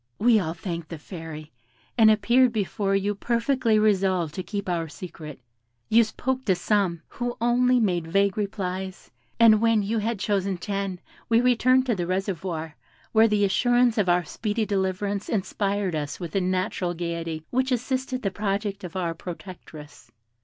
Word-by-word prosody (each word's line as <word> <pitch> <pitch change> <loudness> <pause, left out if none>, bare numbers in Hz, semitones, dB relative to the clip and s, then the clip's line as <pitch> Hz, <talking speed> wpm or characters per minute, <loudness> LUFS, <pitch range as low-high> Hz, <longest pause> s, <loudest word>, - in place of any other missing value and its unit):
We 225 0 +4
all 165 -3 -3
thanked 170 -2 -5
the 165 - -6
Fairy, 160 -1 -9 0.4
and 225 -2 +6
appeared 240 +4 +4
before 200 -2 -1
you 200 +1 0
perfectly 235 +2 +1
resolved 190 -6 +2
to 185 - -4
keep 200 +1 -5
our 170 -3 -1
secret. 150 -2 -9 0.5
You 230 +1 +6
spoke 260 +4 -3
to 190 - +3
some, 180 -3 0
who 245 0 -4
only 245 +2 +3
made 175 -7 0
vague 195 +3 +2
replies, 190 -2 -4 0.3
and 220 -2 +7
when 230 -2 +3
you 220 +3 -1
had 225 +1 -1
chosen 195 -2 -1
ten, 195 0 -3 0.3
we 230 0 +5
returned 250 +1 +3
to 245 - +1
the 175 -4 -2
reservoir, 180 -4 -3 0.4
where 220 0 +5
the 210 -2 +2
assurance 240 +4 +3
of 190 -3 +2
our 175 0 +3
speedy 215 +6 -2
deliverance 200 0 -1
inspired 200 -2 -1
us 145 -2 -4
with 170 -2 -6
a 195 - +2
natural 185 -1 -1
gaiety 165 -2 -4
which 260 +1 0
assisted 255 +1 -2
the 195 - 0
project 200 0 -2
of 180 -1 -8
our 175 -3 -1
protectress. 165 -3 -10
200 Hz, 160 wpm, -25 LUFS, 180-225 Hz, 0.5 s, and